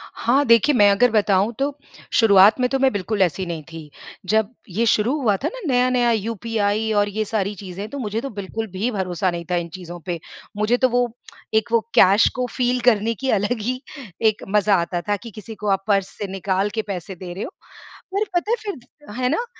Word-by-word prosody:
हाँ, 270 +5 +2
देखिए, 235 +4 +5
मैं 205 -4 +6
अगर 245 +4 +3
बनाऊँ, 205 0 +2
तो 280 +1 -1 0.4
शुरुआत 205 0 +6
में 250 - +3
तो 270 - 0
मैं 265 0 +3
बिल्कुल 205 +1 -2
ऐसी 185 +1 +1
नहीं 165 -3 -5
थी। 160 -2 -9 0.4
जब 220 0 +2 0.2
ये 220 +6 0
शुरू 225 +3 +2
हुआ 210 -5 +3
था - - +2
ना - - -7
नया-नया, 250 -2 +2
यूपीआई 220 0 -1
और 205 0 +2
ये 215 +2 -2
सारी 205 -1 -1
चीज़ें, 195 +2 -7
तो 285 - -6
मुझे 220 -2 -2
तो 275 - -5
बिल्कुल 210 +1 -5
भी 200 +7 -1
भरोसा 185 -3 -1
नहीं 170 0 -5
था - - +2
इन 170 -1 -2
चीज़ों 175 -2 -8
पे। 175 -3 -3 0.4
मुझे 215 +4 +2
तो 255 0 +3
वो 245 0 +2 0.5
एक 220 +1 +2
वो 230 - +5 0.2
कैश 195 +3 +6
को 250 -1 -1
फ़ील 250 0 0
करने 225 0 +1
की 265 - 0
अलग 220 +4 -1
ही 255 +4 -2 0.5
एक 215 - -6
मज़ा 210 0 +3
आता 175 +1 -3
था 205 - +3
कि 230 - -9
किसी 215 +2 -9
को 210 - -6
आप 195 0 0
पर्स 195 -2 +2
से 205 - -4
निकाल 195 +1 -1
के - - +2
पैसे 190 -1 -5
दे 180 0 -8
रहे 190 - -5
हो। - - -6 0.6
पर 405 +2 +1
पता 350 +5 0
है - - +4
फिर 295 - -9
है 250 0 +1
ना? 460 +11 0
215 Hz, 215 wpm, -22 LUFS, 195-245 Hz, 0.6 s, मैं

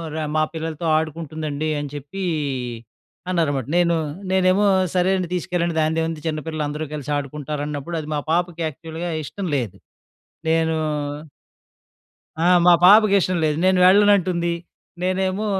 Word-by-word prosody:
ర - - -3 0.2
మా 155 - +3
పిల్లలతో 160 0 -4
ఆడుకుంటుందండి 155 -1 -3
అని 145 -1 -5
చెప్పీ 145 +8 -6 1.1
అన్నారన్నమాట. 145 -8 0
నేను, 170 -1 +3 0.4
నేనేమో 190 +2 +3 0.3
సరే 180 +1 +3
అండి 180 -2 -2
తీసుకెళ్ళండి 175 -1 -1
దానిదేముంది 160 0 -1
చిన్న 155 -1 -1
పిల్లలు 155 -2 -2
అందరూ 150 +2 -4
కలిసి 145 -1 -5
ఆడుకుంటారన్నప్పుడు, 145 +2 -4
అది 150 - -10
మా - - 0
పాపకి 175 0 0
యాక్చువల్‌గా 160 +3 -6
ఇష్టం 190 +6 -5
లేదు. 115 -8 -4 0.7
నేను 160 0 +2 1.6
ఆ! 165 - +1 0.2
మా 175 - +8
పాపకి 210 0 +7
ఇష్టం 185 0 0
లేదు. 150 -1 0
నేను 185 -1 +4
వెళ్ళనంటుంది. 185 -3 +4 0.5
నేనేమో 185 +2 0
165 Hz, 125 wpm, -22 LUFS, 150-185 Hz, 1.6 s, మా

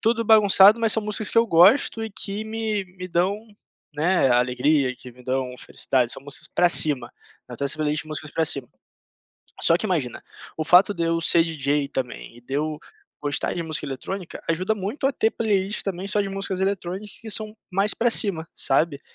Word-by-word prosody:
tudo 230 0 +1
bagunçado, 210 0 +6
mas 225 -1 +2
são 220 - 0
músicas 210 0 -3
que - - -8
eu 230 0 +5
gosto 210 +7 +4
e 220 - -5
que 205 +2 -4
me 220 -2 -2
me 185 0 -6
dão, 190 +6 -1 0.5
né, 160 -2 +2
alegria, 125 +3 +2
que 125 - -12
me 125 - -17
dão 130 0 -2
felicidade, 125 -3 -1
são - - -4
músicas 140 0 -7
para 175 -1 +2
cima, 140 -8 +2 0.3
eu 125 - -9
tenho 140 - -1
essa 140 - -1
playlist 150 0 -1
de - - -15
músicas 155 0 -5
para 160 +1 0
cima. 135 -4 -2 0.9
Só 165 - +5
que - - -3
imagina, 155 - -2 0.3
o 155 - -3
fato 180 +5 +5
de 170 - -4
eu 165 0 +1
ser 165 0 +4
DJ 145 -3 -1
também, 125 -2 -6
e 120 - -16
de 135 - -12
eu 155 0 -3 0.4
gostar 145 -1 -2
de 170 - -3
música 160 -1 -2
eletrônica 170 +7 -6
ajuda 185 +6 0
muito 210 +8 -5
a - - +3
ter 220 - +1
playlists 205 -3 -1
também 190 -1 -4
só 205 +1 0
de 200 - -2
músicas 195 -1 -4
eletrônicas 195 +1 -3
que 225 - -11
são 215 +1 -4 0.2
mais 195 +3 +1
para 240 - +1
cima, 175 -8 +1
sabe? 140 +1 +1
175 Hz, 200 wpm, -23 LUFS, 145-205 Hz, 0.9 s, bagunçado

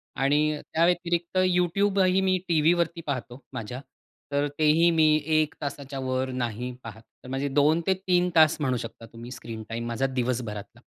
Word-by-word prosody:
आणि 150 +3 +1
त्या 165 +1 +4
व्यतिरिक्त 175 0 0
YouTubeही 185 +1 +2
मी 185 -1 +2
टीव्हीवरती 170 +1 +2
पाहतो 130 -2 -4
माझ्या, 125 +2 -5 0.5
तर 145 +1 +1
तेही 160 +3 +4
मी 160 -1 +4 0.3
1 155 -1 +1
तासाच्यावर 130 -2 -3
नाही 125 0 -3
पाहत. 110 -1 -9 0.2
तर 130 - -10
माझे 135 +2 -2
2-3 175 +5 +2
तास 155 -2 +6
म्हणू 130 -3 +1
शकता 115 0 -8
तुम्ही 120 +2 -9
स्क्रीन 115 -3 -7
टाईम 115 +1 -4
माझा 120 +3 0
दिवसभरातला. 120 -5 -3
145 Hz, 145 wpm, -26 LUFS, 125-170 Hz, 0.5 s, तास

